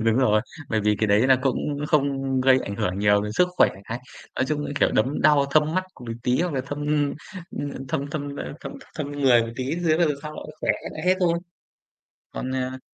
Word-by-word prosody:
Đúng 115 +1 +3
rồi, 110 -5 +4 0.3
bởi 110 -1 +1
vì 105 0 +2
cái 110 - +2
đấy 105 +5 +4
là 130 -1 +6
cũng 135 -3 +1 0.3
không 135 -3 +1
gây 130 0 +5
ảnh 100 - -5
hưởng 90 0 -1
nhiều 105 0 +4
đến 105 - -4
sức 180 +10 +3
khỏe. - - +6 0.2
Cái 120 +4 -4 0.4
nói 130 - +2
chung, 150 0 -1
ư, - - -4
kiểu, - - +4
đấm 130 +7 +1
đau 150 -2 +5
thâm 155 +2 +3
mắt 185 0 +1
c - - -19
một 115 -2 -5
tí, 125 +3 +2
hoặc 175 -4 -1
là 130 - +1
thâm, 145 +1 -4 0.6
ưm, 145 - -4
ơ, - - -6
thâm 140 - -1
thâm, 145 -1 -4
ơ, - - -5
thâm - - -7 0.2
thâm 145 -2 -4
người 130 -5 +4
một 115 0 -5
tí 130 - -2
thế 165 -3 +2
rồi 160 -4 +3
sau 150 0 -6
nó - - -7 0.2
khỏe - - +1
hết - - -8
lại - - -7
hết 185 - +5
thôi. 170 -2 +2 1.0
Còn, 130 - -4
à 130 0 -3
135 Hz, 240 wpm, -24 LUFS, 115-150 Hz, 1.0 s, là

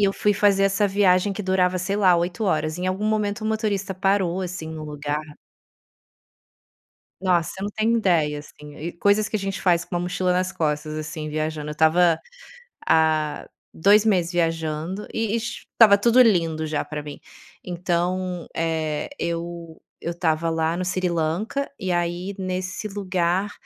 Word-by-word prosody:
e - - +6
eu 195 - +1
fui 205 +1 +1
fazer 200 -1 +3
essa 200 +1 +2
viagem 195 0 +3
que 210 - -5
durava, 185 -1 +1
sei 195 +3 -2
lá 185 -4 +5
8 175 +6 -2
horas. 155 -2 0
Em 180 - -2
algum 190 +3 -1
momento 215 0 0
o - - -2
motorista 205 -3 -1
parou, 190 -1 +1
assim, 180 -3 -5
no 155 -1 -6
lugar 150 0 -3 2.0
nossa, 180 -3 +1
você 190 - -8
não 205 - -2
tem 220 +2 +1
ideia, 165 -9 +2
assim, 150 0 -12
e 170 +3 -5
coisas 205 +4 +2
que 215 - -1
a - - -2
gente 195 -1 -4
faz 175 -2 +2
com - - -8
uma 175 - 0
mochila 180 0 0
nas 185 +1 0
costas, 155 -3 -2
assim, 155 0 -5
viajando, 155 0 -3
eu - - -3
estava 160 +2 +4 0.7
há 155 -2 +2 0.3
2, 205 +5 +4
meses 180 -5 +2
viajando 165 +2 -2
e 225 0 0
e - - +1
ti 235 - -6
estava 210 -3 +7
tudo 235 +4 +5
lindo 165 -8 +2
já 150 -1 -1
pra 150 -1 -6
mim. 145 -1 -8 0.4
Então, 180 0 -2
eh, 160 - -1
eu 170 -1 -5 0.2
eu 170 - -3
estava 165 -1 0
lá 160 +1 0
no 185 - -2
Sri 180 0 0
Lanka, 170 - -1
e 185 -3 -2
aí, 175 +3 -2
nesse 185 +2 -3
lugar, 190 -1 -1
180 Hz, 175 wpm, -23 LUFS, 160-195 Hz, 2.0 s, estava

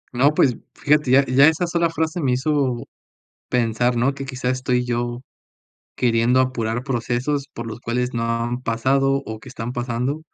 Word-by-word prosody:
No, 140 +5 +3
pues, 125 -3 +3 0.2
fíjate 150 -2 +2
ya 135 +2 +5
ya 135 +3 +5
esa 160 +3 +2
sola 170 -1 +1
frase 160 +1 -2
me 130 -3 +1
hizo 130 -2 0 0.7
pensar, 120 0 +1
¿no? 130 +4 +2
Que, 140 0 -6
quizás, 130 -1 -2
estoy 125 -1 0
yo 120 0 -2 0.7
queriendo 120 +1 +3
apurar 120 -1 -1
procesos 135 +2 -1
por 115 - -6
los 115 +1 -7
cuales 125 +1 -2
no 115 -1 -2
han 115 +1 -1
pasado, 135 +4 +1
o 110 -1 -7
que 130 - -12
están 120 -1 -5
pasando, 125 +4 -2
125 Hz, 170 wpm, -22 LUFS, 120-140 Hz, 0.7 s, ya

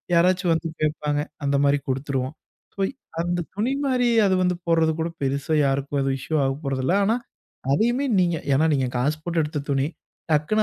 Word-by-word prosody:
யாராச்சும் 180 0 +3
வந்து 165 +1 -1 0.2
கேட்பாங்க. 150 -1 0 0.2
அந்த 140 0 +2
மாரி 140 0 +3
குடுத்துருவோம். 130 +1 -2 0.4
ஸோ, - - -14 0.4
அந்த 175 +1 -1 0.2
துணி 225 +6 0
மாரி 250 -2 +2 0.2
அது 190 - +2
வந்து 180 0 +2
போடுறது 165 -1 +3
கூட 160 - 0 0.2
பெருசா 140 +3 -1
யாருக்கும் 140 +1 0
எதுவும் 135 0 0
இஷ்யூ 155 +4 -3
ஆகப்போறதில்ல. 135 +3 -1
ஆனா, 220 +3 +3 0.6
அதையுமே 240 - +2
நீங்க 175 -2 +2 0.2
ஏன்னா 155 +4 +3
நீங்க 135 -2 +1
காசு 140 +5 +1
போட்டு 170 0 0
எடுத்த 150 0 -3
துணி. 135 0 +2 0.5
டக்குனு 155 +9 +2
155 Hz, 165 wpm, -24 LUFS, 140-175 Hz, 0.6 s, யாராச்சும்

